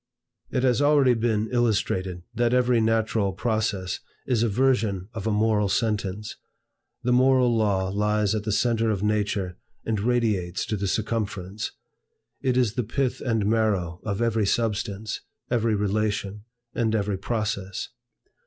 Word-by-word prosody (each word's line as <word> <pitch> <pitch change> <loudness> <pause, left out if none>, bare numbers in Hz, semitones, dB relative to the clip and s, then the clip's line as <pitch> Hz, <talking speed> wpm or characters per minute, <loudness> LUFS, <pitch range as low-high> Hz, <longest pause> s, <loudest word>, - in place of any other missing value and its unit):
It 125 - -1
has 130 +1 +3
already 145 -3 +5
been 110 -2 0
illustrated, 100 -7 0
that 120 +1 +2
every 125 -2 +3
natural 110 -3 +1
process 105 -4 -1 0.3
is 120 -4 +1
a 115 - +2
version 105 -5 +1
of 110 -2 -4
a - - +2
moral 105 -1 +2
sentence. 105 -1 -1 0.7
The 125 - +1
moral 130 -1 +4
law 100 -4 +1
lies 105 +1 +1
at 110 -2 -1
the 110 - -2
centre 115 +1 +2
of 105 -2 -1
nature 105 -3 0 0.3
and 110 -2 0
radiates 105 -6 0
to 110 - -2
the 100 -1 -2
circumference. 105 -1 -2 0.7
It 130 -1 +1
is 120 -5 +2
the 125 - -1
pith 130 +3 -1
and 115 -5 0
marrow 100 -6 +1
of 105 +2 -1
every 110 -3 +1
substance, 105 -1 -1 0.3
every 115 -2 +2
relation, 105 0 -1 0.3
and 110 -2 +1
every 100 -2 -1
process. 100 -3 -3
110 Hz, 145 wpm, -25 LUFS, 100-115 Hz, 0.7 s, already